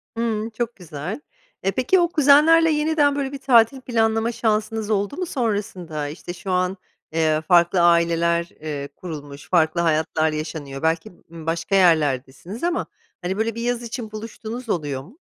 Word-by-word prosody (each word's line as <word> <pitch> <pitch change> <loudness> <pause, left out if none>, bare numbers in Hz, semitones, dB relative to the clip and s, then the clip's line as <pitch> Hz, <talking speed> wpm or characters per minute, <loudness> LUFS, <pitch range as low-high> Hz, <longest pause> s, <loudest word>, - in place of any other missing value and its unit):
Hımm, 225 -1 -1
çok 230 +1 -4
güzel. 175 - -6 0.4
E, 195 - +2
peki, 265 - +2
o 345 - +2
kuzenlerle 315 +3 +6
yeniden 300 -1 +2
böyle 275 -1 -2
bir 280 - -5
tatil 255 0 +4
planlama 225 -1 +1
şansınız 220 -1 -1
oldu 205 - 0
mu 365 - -1
sonrasında? 200 - -3
İşte, 155 +4 -7
şu 190 +1 -6
an, 185 +1 0 0.3
eee, 155 -1 +1
farklı 175 +2 +4
aileler, 170 0 +3
eee, 145 -2 -5
kurulmuş, 145 -5 -9
farklı 170 -1 +3
hayatlar 160 -1 +1
yaşanıyor, 155 -3 -5
belki, 160 0 0 0.2
ımm, 165 -2 -10
başka 165 +3 -1
yerlerdesiniz 160 - +1
ama, 350 0 0 0.4
hani, 185 +2 -2
böyle 225 0 -1
bir 230 - -4
yaz 240 0 -1
için 230 -1 -6
buluştuğunuz 225 +2 -7
oluyor 145 -8 -2
mu? 210 - -17
195 Hz, 155 wpm, -22 LUFS, 160-235 Hz, 0.4 s, kuzenlerle